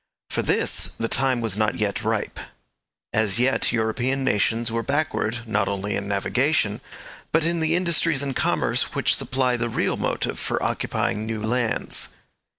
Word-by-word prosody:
For - - +1
this - - +1
the 115 - -1
time 130 -1 +2
was 110 -4 +1
not 110 0 +1
yet 105 -2 -1
ripe. - - -1 0.7
As 110 -2 +2
yet 130 +2 +2
European 120 +4 0
nations 115 -1 +1
were 115 0 0
backward, 140 -4 -1
not 105 -2 +1
only 100 +1 -2
in 100 - -3
navigation, 110 +3 +1 0.5
but 160 0 +3
in 170 0 +1
the 160 +1 +2
industries 165 -5 +2
and 135 -2 -3
commerce - - +1
which - - +3
supply 130 -1 0
the 120 0 -1
real - - 0
motive - - -1
for - - -1
occupying 105 +2 -1
new 110 -1 -3
lands. 120 0 0
120 Hz, 155 wpm, -24 LUFS, 110-135 Hz, 0.7 s, but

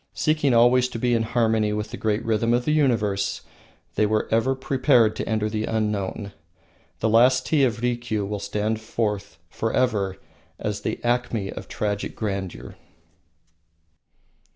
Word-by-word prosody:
Seeking 155 -3 +1
always 120 +2 +5
to 120 - -6
be 120 +1 +1
in 115 - +2
harmony 110 -2 +1
with 105 +1 -3
the - - -4
great 110 +1 -1
rhythm 115 +1 +2
of 120 0 -1
the - - +1
universe, 115 -10 +1 0.5
they 105 - +2
were 110 0 0
ever 115 +4 +2
prepared 130 -4 +3
to - - -3
enter 110 -1 0
the 110 0 -2
unknown. 105 -2 -2 0.7
The 110 - +2
"Last 125 +3 +4
Tea 150 -3 +2
of 120 -1 -2
Rikiu" 120 -4 -1
will 105 +1 -3
stand 105 +2 -2
forth 105 -3 -3
forever 110 -5 0 0.4
as - - -3
the - - -3
acme 120 -4 0
of - - -8
tragic 105 -1 -3
grandeur. 95 - -5
110 Hz, 150 wpm, -24 LUFS, 105-120 Hz, 0.7 s, always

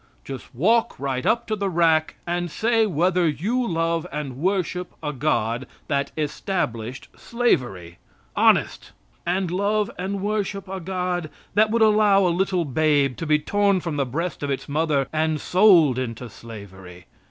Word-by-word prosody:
Just 135 -2 -9
walk 225 - +2
right 130 -2 -2
up 235 +1 +2
to 220 - -1
the 200 -1 -2
rack 160 -3 +2
and 175 0 -2
say 225 +5 +2
whether 175 0 +2
you 215 - -1
love 165 -1 -1
and 145 -4 -4
worship 180 +1 -1
a 150 -1 -2
God 125 -3 -1 0.2
that 140 0 0
established 135 - -3
slavery. 110 - -1 0.4
Honest! - - +2 0.3
And 180 0 0
love 205 +3 0
and 195 +2 -3
worship 205 -1 -2
a 190 0 -5
God 180 -2 -3 0.2
that 215 +2 +4
would 225 +1 +3
allow 210 -2 +4
a - - +3
little 185 -1 0
babe 145 -2 +2
to 165 - -4
be 150 0 +4
torn 200 +5 +1
from 165 -4 -4
the 140 - +1
breast 165 +7 -3
of 145 - -3
its 135 -1 -3
mother 145 -2 0
and 155 0 0
sold 175 - +5
into 120 -2 -5
slavery. 95 -6 -11
165 Hz, 155 wpm, -23 LUFS, 140-195 Hz, 0.4 s, sold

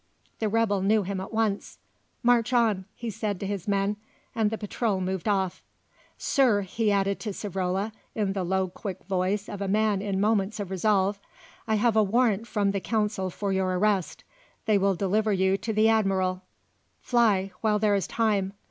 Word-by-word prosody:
The 220 - 0
rebel 210 -3 +1
knew 210 +2 +3
him 190 0 -3
at 190 - -7
once. 220 -3 -1 0.5
"March 240 0 +3
on," 220 -6 +2
he 235 -1 -5
said 205 -2 -3
to - - -4
his 200 -2 -4
men, 200 +1 +1 0.4
and 220 -2 +1
the 220 - -3
patrol 210 -1 -1
moved 185 0 -3
off. 190 -3 0 0.6
"Sir," 245 -8 +2
he 210 +3 -1
added 200 0 +1
to 220 - -4
Savrola, 195 +1 -2 0.2
in 205 -3 0
the 195 -2 -2
low, 190 +1 0
quick 185 +1 -7
voice 190 +2 -1
of 200 -1 -7
a 200 - -1
man 210 0 +2
in 200 -2 -2
moments 210 0 +1
of 195 -2 -5
resolve, 200 +1 +1 0.5
"I 220 - +2
have 220 +1 +2
a 220 - +6
warrant 225 +1 +2
from 205 -3 +1
the 200 - -1
Council 205 +1 -1
for 195 +2 -3
your 185 -1 0
arrest. 200 -2 0 0.4
They 215 -3 +3
will 195 0 +2
deliver 205 +3 +1
you 190 0 +2
to 215 +3 -4
the 215 +1 +3
Admiral. 190 -4 +1 0.6
Fly, 210 -6 +2
while 215 -1 +2
there 210 -1 +2
is 200 -2 0
time. 205 -4 0
205 Hz, 185 wpm, -27 LUFS, 190-220 Hz, 0.6 s, a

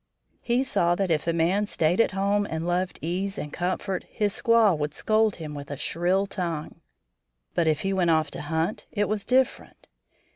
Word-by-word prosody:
He 245 +2 +1
saw 175 -11 +1
that 190 -1 -1
if 155 0 0
a - - +3
man 175 +5 +1
stayed 170 +2 +2
at 230 - +1
home 200 +1 +1
and 160 +1 -3
loved 180 +1 -1
ease 190 +4 -2
and 150 - -5
comfort 185 +1 -2
his 205 -2 -1
squaw 225 -5 +4
would 150 0 -3
scold 220 -1 +2
him 155 -3 -7
with 145 -1 -8
a 145 - -5
shrill 180 +6 0
tongue. 170 -6 -4 0.7
But 170 -2 +1
if 155 -2 +2
he 195 0 -1
went 180 -3 +2
off 155 -2 +2
to - - -6
hunt, 160 +6 -2
it 205 -2 0
was 210 -1 -2
different. 260 +1 0
180 Hz, 190 wpm, -26 LUFS, 160-205 Hz, 0.7 s, squaw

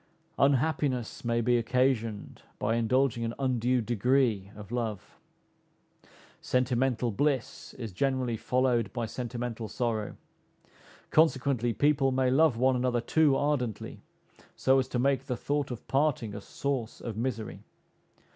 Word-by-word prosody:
Unhappiness 140 -3 +1
may 120 0 +1
be 120 +1 +3
occasioned 115 -3 -1 0.2
by 110 - 0
indulging 120 +1 +1
an 115 0 -3
undue 125 -2 +1
degree 120 -3 +1
of 105 0 -11
love. 115 -5 -4 1.2
Sentimental 125 -1 +1
bliss 135 +1 -2
is 115 -4 -6
generally 130 +3 0
followed 120 -3 +1
by 120 - -2
sentimental 120 -1 -5
sorrow; 110 -1 -2 0.9
consequently, 135 -6 +2
people 135 +3 +2
may 130 -1 +2
love 145 -2 +4
one 130 +2 +3
another 125 -1 +1
too 150 +3 +3
ardently, 135 -6 -2 0.5
so 135 0 +3
as 130 - -1
to - - -3
make 135 +1 +1
the 125 - -2
thought 145 -1 -1
of 120 -3 -7
parting 135 -6 0
a 105 - -6
source 130 0 -3
of 115 -3 -6
misery. 115 -1 -3
125 Hz, 130 wpm, -29 LUFS, 115-135 Hz, 1.2 s, love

